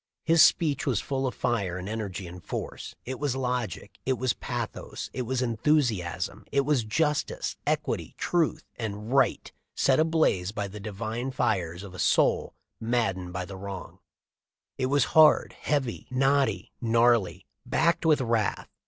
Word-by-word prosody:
His 165 -1 +6
speech 145 -5 +3
was 125 -7 +2
full 135 -1 -2
of 125 - -4
fire 100 -8 -1
and 95 +1 -6
energy 100 -4 -4
and 90 0 -10
force; - - -6
it 130 +1 -5
was 145 -3 0
logic; 125 -6 -3
it 130 - +1
was 125 -1 +1
pathos; - - -5
it 125 -2 -3
was 130 0 0
enthusiasm; 120 - 0
it 140 - +3
was 140 -3 +1
justice, 150 - -1
equity, - - -1
truth, 170 -4 0
and 110 +1 -4
right 135 -3 +2 0.2
set 135 +1 +3
ablaze 155 - +2
by 105 -1 -3
the 105 +2 -9
divine 110 +4 -4
fires 90 -8 -1
of 100 -2 -9
a 90 - -9
soul - - +2 0.2
mad 115 -4 +1
dened 90 -1 -7
by 90 +1 -3
the 95 +2 -8
wrong; 95 -1 -7 0.8
it 130 - -1
was 140 0 +3
hard, 155 -1 +6
heavy, 135 -6 -2
knotty, 135 -6 +1
gnarly, 115 -3 +2 0.2
backed 170 +1 +2
with 155 -4 +4
wrath. 115 -4 0
120 Hz, 155 wpm, -27 LUFS, 100-135 Hz, 0.8 s, His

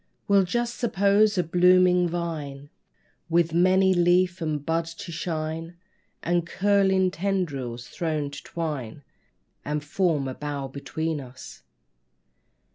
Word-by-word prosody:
We'll 200 -1 +4
just 240 +5 -2
suppose 210 -2 +3
a 180 - +3
blooming 180 +1 +4
vine 150 -5 -5 0.6
With 165 -1 +2
many 185 +2 +4
leaf 180 +1 +2
and 150 -3 -2
bud 165 0 0
to 165 +1 -8
shine, 165 0 -4 0.5
And 175 0 0
curling 190 -1 +2
tendrils 145 -11 -3
thrown 155 -4 -3
to - - -8
twine 145 -6 -5 0.6
And 150 +1 -3
form 150 -2 0
a 130 - -4
bower, 145 -1 -5
between 160 +3 -3
us. 125 - -12
170 Hz, 120 wpm, -25 LUFS, 150-185 Hz, 0.6 s, We'll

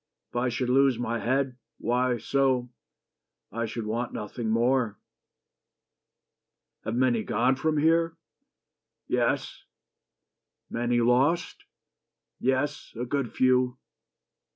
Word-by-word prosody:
If - - -21
I 125 +1 +1
should 125 +1 -2
lose 135 -1 +4
my 115 -1 -2
head, 130 0 0 0.2
why, 125 0 +1
so, 130 0 +1 0.8
I 115 +2 -2
should 115 0 -5
want 115 +3 -2
nothing 110 +2 -4
more.... 115 -1 +2 1.9
Have 110 - -3
many 125 -2 +2
gone 120 +5 +2
From 155 +3 0
here?" 165 +2 +2 0.9
"Yes." - - 0 1.1
"Many 120 0 +1
lost?" 130 +8 +2 0.7
"Yes: 135 +2 -1
good 140 -4 -1
few. 130 0 +2
125 Hz, 100 wpm, -27 LUFS, 120-135 Hz, 1.9 s, lose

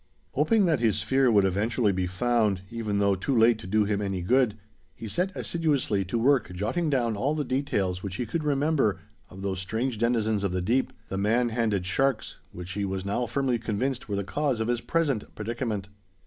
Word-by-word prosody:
Hoping 190 - +3
that 160 -6 +2
his 115 -3 +2
sphere 135 -1 +2
would 105 -4 +4
eventually 105 +3 +1
be 95 -1 -1
found, 105 0 +1
even 110 -3 -2
though 100 0 +3
too 115 +8 -1
late 115 0 +5
to 90 - -9
do 105 +2 +3
him 105 0 -1
any 95 -3 -2
good, 120 +1 +2 0.4
he 115 - -7
set 180 - -1
assiduously 145 - 0
to 95 +6 -2
work 125 -3 +2
jotting 115 - -1
down 120 -5 +1
all 135 +9 0
the 150 - -1
details 105 -10 -1
which 95 -2 -5
he 125 - -2
could 155 +8 -3
remember 145 - +1 0.3
of 95 +1 -10
those 95 -2 -2
strange 110 +5 -2
denizens 110 -3 +1
of 100 -2 -1
the 90 - 0
deep, 125 +7 +1 0.2
the 95 - -2
man 115 +4 +2
handed 110 -5 0
sharks, 135 +4 0
which 90 +1 -7
he 100 +2 -2
was 95 -1 -3
now 120 +5 -1
firmly 130 -4 0
convinced 120 +3 -2
were 100 - -1
the 100 - -1
cause 140 +3 -1
of 110 +1 -1
his 120 -1 0
present 145 -9 -1
predicament. 110 -3 -3
115 Hz, 205 wpm, -27 LUFS, 100-130 Hz, 0.4 s, late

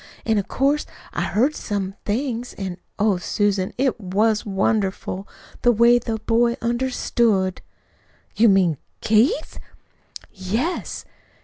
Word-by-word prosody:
An' 220 -2 +2
of 200 - -4
course 280 +3 +1 0.3
I - - -2
heard 265 +8 +1
some 195 -3 -3
things. 240 +2 -2
An', 190 -3 -5 0.2
oh, 205 -2 +2
Susan, 195 +1 0
it 260 -2 +1
was 210 +3 +1
wonderful, 195 -1 -1 0.3
the 245 - +5
way 235 +2 +5
that 225 -2 -4
boy 235 +1 +2
understood." 235 -5 0 0.7
"You 230 +1 +5
mean 180 -7 +3 0.2
Keith?" 225 +8 +2 0.7
"Yes. 220 - -3
220 Hz, 115 wpm, -22 LUFS, 195-240 Hz, 0.7 s, the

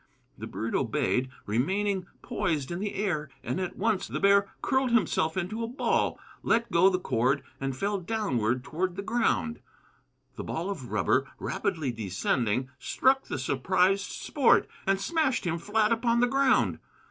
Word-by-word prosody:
The - - -7
bird 115 +1 -4
obeyed, 130 0 0 0.2
remaining 190 - 0 0.2
poised 155 -4 -1
in 175 - -3
the 205 0 -3
air; 175 -8 -1
and - - -2
at 185 -1 -3
once 215 -1 0
the - - -3
bear 200 0 +4
curled 265 -1 +2
himself 185 -7 +1
into 205 +5 -2
a - - -2
ball, 250 +5 0 0.2
let 230 +1 +1
go 175 +3 +6
the 185 - +1
cord, 135 -3 +1 0.2
and 135 -1 -3
fell 200 +5 -1
downward 130 - -1
toward 175 +5 -2
the 195 - -4
ground. 235 +1 0 0.8
The - - -4
ball 175 +5 -3
of 130 -11 -7
rubber, - - +1
rapidly 150 -6 -2
descending, 115 +4 -1
struck 265 - +2
the - - -4
surprised 185 +9 +1
Sport 275 -5 +2 0.2
and 195 0 +3
smashed 305 - 0
him 170 -1 -1
flat 210 +4 +1
upon 235 +1 +2
the 245 - +5
ground. 270 +1 +2
185 Hz, 160 wpm, -28 LUFS, 135-220 Hz, 0.8 s, go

